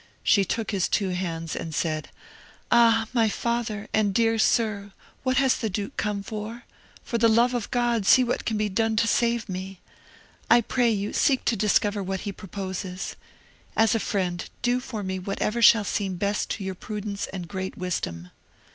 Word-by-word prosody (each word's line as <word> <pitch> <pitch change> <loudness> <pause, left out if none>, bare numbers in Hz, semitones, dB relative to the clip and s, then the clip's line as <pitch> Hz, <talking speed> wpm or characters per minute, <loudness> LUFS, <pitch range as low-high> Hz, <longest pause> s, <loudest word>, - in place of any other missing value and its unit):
She 200 - +4
took 220 +3 -2
his 195 -3 0
two 195 -2 +1
hands 165 -3 -3
and 160 -2 -5
said, 155 -1 -2 0.6
"Ah, 230 -1 +5
my 225 -3 +3
father, 230 -2 -2
and 205 -3 +2
dear 225 -1 +3
sir, 205 -3 +1 0.3
what 260 -1 0
has 265 -2 +4
the 220 - -2
duke 200 +1 -4
come 205 -1 -2
for? 220 +3 -6 0.4
for 235 - -2
the 230 - +5
love 235 +3 +4
of 240 -4 -2
God 240 -4 +1
see 255 - +7
what 245 - -1
can 220 - -1
be 210 0 +1
done 220 +3 0
to 220 - +3
save 235 -1 +1
me! 190 0 -6 0.7
I 235 - +7
pray 245 +1 +1
you, 205 -2 -1
seek 270 -3 +2
to 235 - +2
discover 205 0 +2
what 190 0 -3
he 200 - -4
proposes. 190 -1 -5 0.6
As 220 -1 +4
a 225 - +1
friend, 180 -4 -2
do 245 0 +2
for 235 -5 -6
me 190 0 -3
whatever 205 +4 -2
shall 225 -1 +7
seem 195 -2 -2
best 200 +3 -1
to 205 - -3
your 190 0 -3
prudence 205 +1 -5
and 180 -3 -6
great 190 +1 -5
wisdom." 90 - -4
210 Hz, 180 wpm, -25 LUFS, 190-230 Hz, 0.7 s, see